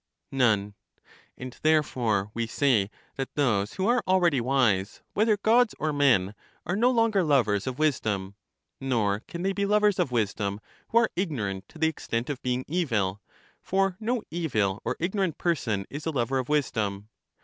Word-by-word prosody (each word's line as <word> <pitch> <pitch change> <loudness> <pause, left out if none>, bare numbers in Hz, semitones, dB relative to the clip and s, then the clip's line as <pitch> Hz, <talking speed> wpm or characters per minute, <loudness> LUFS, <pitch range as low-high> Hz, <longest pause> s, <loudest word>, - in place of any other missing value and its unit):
None. 110 -6 +2 0.6
And 130 -1 -8
therefore 120 -10 +1
we 115 0 -2
say 115 -5 +2 0.3
that 135 -1 -4
those 110 -9 +1
who 190 - -2
are 240 +1 +3
already 175 -8 +3
wise, 115 -6 +1
whether 215 +1 +3
Gods 225 +3 +3
or 155 0 -1
men, 120 -9 +3 0.3
are 175 - -1
no 235 +5 +3
longer 230 -5 +3
lovers 125 - +2
of 130 -1 -3
wisdom; 110 -11 0 0.5
nor 110 -6 0
can 170 +1 -6
they 195 +1 +1
be 200 0 -1
lovers 210 -1 +3
of 125 - +1
wisdom, 105 -3 -1 0.3
who 230 - +1
are 235 -1 +4
ignorant 105 - -3
to - - -14
the 160 - +1
extent 125 -5 -3
of 135 - -6
being 125 0 -1
evil, 115 - -1 0.4
for 195 -1 0
no 230 +1 -1
evil 110 - -1
or 125 - -2
ignorant 185 -1 -1
person 115 - -1
is 150 +3 -6
a - - +1
lover 130 -1 0
of 130 - -4
wisdom. 110 -8 -1
135 Hz, 165 wpm, -27 LUFS, 105-175 Hz, 0.6 s, are